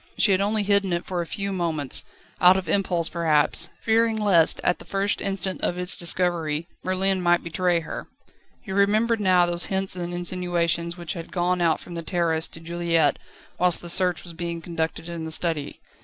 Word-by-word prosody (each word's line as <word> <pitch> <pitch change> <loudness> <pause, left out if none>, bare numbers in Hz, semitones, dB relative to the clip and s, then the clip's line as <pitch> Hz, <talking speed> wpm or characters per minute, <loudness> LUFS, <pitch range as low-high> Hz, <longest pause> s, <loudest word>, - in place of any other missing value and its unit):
She 205 - +4
had 190 0 +3
only 210 +1 +1
hidden 200 -2 +2
it 170 - -2
for 180 -2 -2
a 170 - -5
few 200 +2 -3
moments, 160 -6 0 0.4
out 180 +1 +7
of 190 -3 -4
impulse 175 -1 +2
perhaps, 160 -4 +1
fearing 225 0 +2
lest, 195 -7 +3
at 180 - +1
the - - -10
first 195 0 -1
instant 195 -1 -3
of 175 - 0
its 180 0 +1
discovery, 170 -3 -1 0.2
Merlin 190 0 +1
might 175 0 +2
betray 175 0 0
her. 160 - -7 0.6
He 205 - -8
remembered 215 +4 +2
now 185 -3 +4
those 175 0 +2
hints 190 -1 -1
and 175 -1 -4
insinuations 175 -1 -1
which 170 -2 -4
had 170 -2 -8
gone 180 0 0
out 165 -2 +2
from 175 - -11
the 170 - -4
Terrorist 165 -1 -1
to - - -6
Juliette 165 -2 0 0.4
whilst 180 -1 +2
the 175 - -7
search 180 -1 +2
was 170 - -9
being 170 0 -4
conducted 165 -1 -4
in 170 -1 -5
the 160 - -5
study. 160 -2 -1
175 Hz, 190 wpm, -24 LUFS, 170-190 Hz, 0.6 s, out